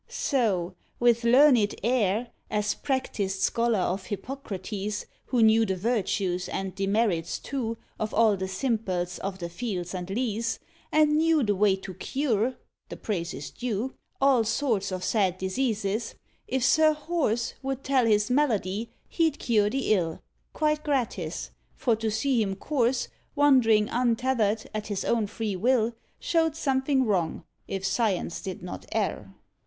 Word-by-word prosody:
So 200 - 0 0.3
with 240 -1 +3
learned 245 -3 +5
air, 230 -1 +1 0.2
As 210 0 0
practised 205 -8 -2
scholar 235 -2 +2
of 185 +2 -2
Hippocrates, 210 -3 -4 0.2
Who 245 -3 +2
knew 220 +1 +6
the 190 -4 0
virtues 190 -3 -1
and 190 -1 -3
demerits, 195 -4 0
too, 230 -5 -3 0.2
Of 215 0 -2
all 220 -2 +4
the 190 0 -3
simples 190 -5 -2
of 195 -1 -4
the 175 -2 -4
fields 180 -1 -4
and 180 0 -5
leas, 225 +1 -1 0.3
And 300 -1 +4
knew 320 -2 +3
the 205 -2 +2
way 200 0 +3
to 190 0 -8
cure 255 0 -1 0.3
(the - - -7
praise 175 -6 -3
is 140 +1 -7
due) 245 +1 -3 0.3
All 270 -4 +4
sorts 220 -4 0
of 185 -1 -4
sad 190 -3 +1
diseases 215 +1 -1 0.3
if 260 -1 -1
Sir 310 +2 +5
Horse 300 -7 -1
Would 270 -1 -3
tell 260 -3 +2
his 210 +2 +2
malady, 230 -6 +1 0.2
he'd 320 -3 +1
cure 210 -3 +2
the 265 -2 +1
ill, 165 -5 -1 0.3
Quite 305 0 0
gratis; 275 -5 -2 0.2
for 235 -3 +1
to 225 0 -1
see 235 +3 +1
him 195 -2 -1
course, 250 +2 0 0.3
Wandering 250 -7 +5
untethered, 235 -3 +1
at 215 0 -4
his 205 -2 -3
own 225 -3 +1
free 215 -1 -3
will, 235 +3 +2 0.3
Showed 325 -3 +1
something 265 -2 +1
wrong, 185 -7 0 0.2
if 195 0 -3
science 195 -5 0
did 185 -2 -6
not 180 - -7
err. - - -2
225 Hz, 150 wpm, -27 LUFS, 195-260 Hz, 0.3 s, knew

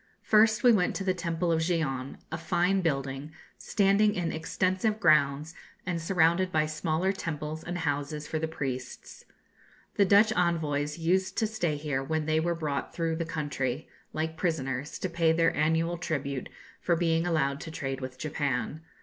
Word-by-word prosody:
First 220 +2 +4
we 245 - +8
went 180 -4 +2
to 195 - -2
the 185 -1 +1
temple 170 -1 -1
of 165 - +2
Gion, 155 -6 -1 0.2
a 160 - -2
fine 180 +3 +1
building, 135 -2 -2 0.3
standing 205 +1 +3
in 170 -2 -1
extensive 185 +6 0
grounds, 150 -2 +3 0.3
and 175 -2 -2
surrounded 170 +1 +2
by 155 -2 +2
smaller 155 +4 0
temples 155 -3 -4
and 175 +1 -4
houses 150 -1 -2
for 155 - -2
the 160 - -1
priests. 130 -5 -6 0.7
The 200 - +5
Dutch 205 +3 +5
envoys 150 -4 0
used 180 +3 0
to 225 - +2
stay 210 -8 -1
here 145 -3 -2
when 155 +2 -1
they 155 0 +2
were 170 +1 0
brought 150 -4 -3
through 165 -1 -1
the 165 - -2
country, 145 -4 -3 0.2
like 160 +1 -3
prisoners, 145 -5 -2
to - - -2
pay 170 -2 +2
their 165 0 +2
annual 165 +3 +1
tribute 140 -5 -3 0.3
for 170 - +1
being 165 0 +1
allowed 140 -4 0
to - - -7
trade 135 -4 -4
with 130 0 -6
Japan. 145 -1 -2
160 Hz, 165 wpm, -28 LUFS, 145-175 Hz, 0.7 s, we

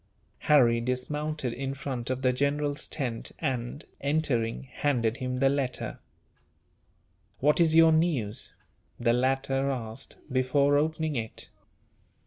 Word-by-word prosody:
Harry 120 -6 +4
dismounted 130 +2 -2
in 135 +2 -4
front 130 -4 -4
of 130 0 -2
the 130 -1 +3
general's 145 +2 0
tent 125 -7 -2
and, 130 -1 -3 0.2
entering, 140 -7 0
handed 130 -4 -1
him 125 0 -3
the 135 +1 +3
letter. 135 -2 -1 1.4
"What 150 +4 +2
is 160 -2 +4
your 165 0 +7
news?" 145 -9 0 0.5
the 120 -1 +3
latter 135 +2 +1
asked, 120 -1 -5 0.2
before 135 +3 +3
opening 155 +1 0
it. 110 -2 -4
135 Hz, 115 wpm, -28 LUFS, 125-145 Hz, 1.4 s, your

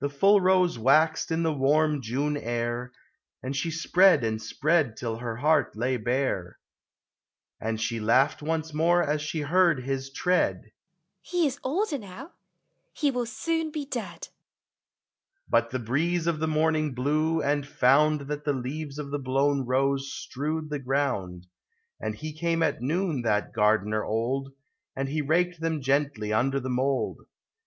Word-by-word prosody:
The 145 - -1
full 195 +8 +4
Rose 185 -6 +3
waxed 155 +7 +3
in 165 0 0
the 160 -1 +1
warm 150 +1 +2
June 135 +6 -1
air, 120 -1 -3 0.5
And 130 +2 -3
she 140 +5 -1
spread 175 0 +4
and 110 -1 -1
spread 145 +2 +1
till 115 -2 -3
her 115 -1 -4
heart 145 0 +2
lay 125 +3 0
bare; 120 -6 -2 1.0
And 110 0 -3
she 115 +1 -2
laughed 125 +8 +2
once 160 0 -2
more 170 +3 +3
as 150 0 -1
she 155 +1 -3
heard 165 -2 +3
his 135 0 -3
tread 180 +6 0
— - - -52
" - - -54
He 350 -2 +2
is 280 -1 -2
older 310 +2 -1
now! 225 - -10 0.6
He 290 -2 +1
will 245 -2 -2
soon 325 +6 -2
be 300 -2 -5
dead! 225 -11 -6 0.6
" - - -56
But 115 0 +3
the 130 - -2
breeze 160 +9 0
of 170 -2 0
the 160 - 0
morning 155 -2 +1
blew, 155 +5 +1
and 145 0 0
found 150 +3 +3
That 145 +1 -5
the 145 - 0
leaves 140 +3 -5
of 145 -2 -6
the 145 - -2
blown 135 0 +1
Rose 135 +1 0
strewed 155 +3 -4
the 145 - -2
ground; 125 -10 -2 0.5
And - - -3
he 155 0 -6
came 165 +1 0
at 120 - 0
noon, 160 +1 -1
that 105 -3 0
Gardener 105 0 +2
old, 130 +5 -2 0.4
And 135 0 -2
he 155 +2 -1
raked 175 +3 0
them 160 -1 -1
gently 135 -6 0
under 135 +5 +1
the 130 0 -5
mold. 130 +2 0
145 Hz, 165 wpm, -27 LUFS, 125-160 Hz, 1.0 s, full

